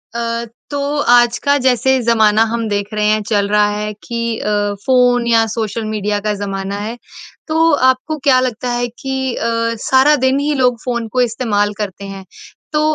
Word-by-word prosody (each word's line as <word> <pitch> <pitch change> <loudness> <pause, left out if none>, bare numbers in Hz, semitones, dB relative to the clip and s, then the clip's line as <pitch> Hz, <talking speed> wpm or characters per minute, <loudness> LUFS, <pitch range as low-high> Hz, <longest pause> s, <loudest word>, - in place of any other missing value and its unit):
अ, 235 0 -2 0.2
तो 285 -1 -3 0.3
आज 240 -1 +4
का 285 0 +2
जैसे 260 +1 +2
ज़माना 220 -2 +3
हम 230 -1 -2
देख 205 -1 -1
रहे 210 0 0
हैं 215 0 +2
चल 205 -2 +1
रहा 210 0 +3
है 210 0 -3
कि 235 -1 -3
अ, - - -3 0.4
फ़ोन 245 -2 +3
या 230 -1 +4
सोशल 220 0 -3
मीडिया 210 -1 -2
का 210 +1 -1
ज़माना 195 -1 -4
है। 220 +3 -5 0.5
तो 325 +1 +3 0.2
आपको 260 +4 -1
क्या 260 -2 +6
लगता 250 -1 -2
है 240 0 -1 0.2
कि 265 -2 -2
अ, - - -4 0.4
सारा 265 +3 +4
दिन 260 +1 +3
ही 295 +1 0
लोग 250 -2 +2
फ़ोन 235 -2 -2
को 255 - +2
इस्तेमाल 220 -4 0
करते 200 -2 -5
हैं 195 -1 -8 0.5
तो 300 - +2
235 Hz, 180 wpm, -16 LUFS, 210-255 Hz, 0.5 s, क्या